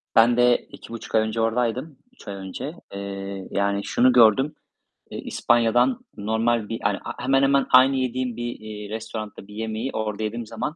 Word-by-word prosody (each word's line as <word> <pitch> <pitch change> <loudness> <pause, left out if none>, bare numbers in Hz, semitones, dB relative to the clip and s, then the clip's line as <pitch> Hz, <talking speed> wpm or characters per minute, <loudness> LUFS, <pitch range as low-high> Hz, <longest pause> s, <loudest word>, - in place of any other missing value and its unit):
Ben 120 +1 +6
de 120 0 +5
2,5 115 -1 -8
ay 110 - +5
önce 110 +1 -1
oradaydım, 125 +5 -1 0.2
3 - - -18
ay 100 - -5
önce. 95 - -6 0.2
Eee, 100 -1 -6
yani, 100 0 0
şunu 125 +4 +3
gördüm: 125 +4 +5 0.6
eee, - - -5
İspanya'dan 120 +2 +2
normal 110 +1 0
bir 115 - -3
hani, 100 -1 +1
he 120 - -8
hemen 135 +1 +3
hemen 140 0 +3
aynı 130 +1 +7
yediğim 130 -2 -1
bir, 120 0 -4
eee, 105 -1 -8
restoranda 110 -2 -6
bir 105 - -12
yemeği 110 +3 -3
orada 110 -1 -3
yediğim 115 +2 -3
zaman, 120 +8 -4
115 Hz, 175 wpm, -24 LUFS, 105-125 Hz, 0.6 s, aynı